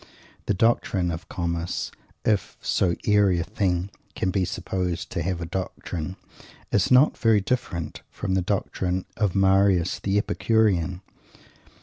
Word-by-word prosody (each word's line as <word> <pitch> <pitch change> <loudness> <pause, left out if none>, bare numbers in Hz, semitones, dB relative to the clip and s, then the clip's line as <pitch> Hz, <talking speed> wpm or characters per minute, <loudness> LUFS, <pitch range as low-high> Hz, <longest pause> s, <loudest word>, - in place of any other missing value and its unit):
The 105 - +2
doctrine 95 -4 +2
of 80 +1 -7
Comus 85 -1 -2 0.3
if 105 -3 0
so 85 -3 +1
airy 100 -3 +4
a - - 0
thing 95 -1 -1 0.2
can 95 - 0
be 95 -2 +1
supposed 90 -2 -3
to - - -2
have 90 +1 -2
a - - -2
doctrine 90 -1 -4 0.6
is 100 - +2
not 130 +4 +6
very 110 -2 +4
different 95 -7 -3
from 95 - -3
the 95 - +2
doctrine 95 -1 -1
of 105 -5 0
Marius 95 -2 +3
the 100 +1 0
Epicurean. 100 -5 +1
95 Hz, 135 wpm, -25 LUFS, 85-100 Hz, 0.6 s, not